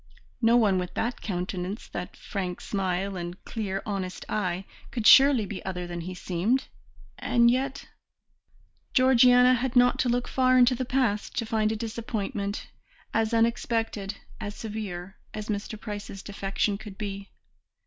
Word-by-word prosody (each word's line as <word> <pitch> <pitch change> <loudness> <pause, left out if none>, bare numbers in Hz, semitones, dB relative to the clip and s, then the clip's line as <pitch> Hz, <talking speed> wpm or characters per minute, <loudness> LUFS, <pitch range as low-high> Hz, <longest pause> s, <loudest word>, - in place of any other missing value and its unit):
No 230 +1 +5
one 200 -5 +3
with 180 -1 -5
that 240 +2 -2
countenance, 185 +1 -4
that 180 +1 -6
frank 185 -3 -4
smile 195 0 -2
and 175 0 -6
clear 195 -4 -3
honest 195 -3 -4
eye 185 -2 -1 0.2
could 230 -4 -4
surely 270 -4 +8
be 200 -1 -6
other 180 -2 -4
than 175 -1 -5
he 185 +2 -6
seemed, 185 +9 0 0.5
and 235 -1 +4
yet 265 +2 -2 1.1
Georgiana 250 -1 +6
had 255 +1 -1
not 245 0 +5
to 250 - +2
look 245 +1 0
far 255 -1 +3
into 250 0 +6
the 255 +1 -2
past 245 -4 0
to 235 - 0
find 215 -1 +1
a - - -1
disappointment, 215 -2 -3 0.5
as 225 0 +1
unexpected, 225 -3 0 0.2
as 205 0 -5
severe, 200 -4 -6 0.2
as 215 0 -6
Mr. 210 +1 -3
Price's 205 -3 -7
defection 200 0 -1
could 210 -3 -10
be. 200 -1 -5
215 Hz, 150 wpm, -27 LUFS, 195-240 Hz, 1.1 s, surely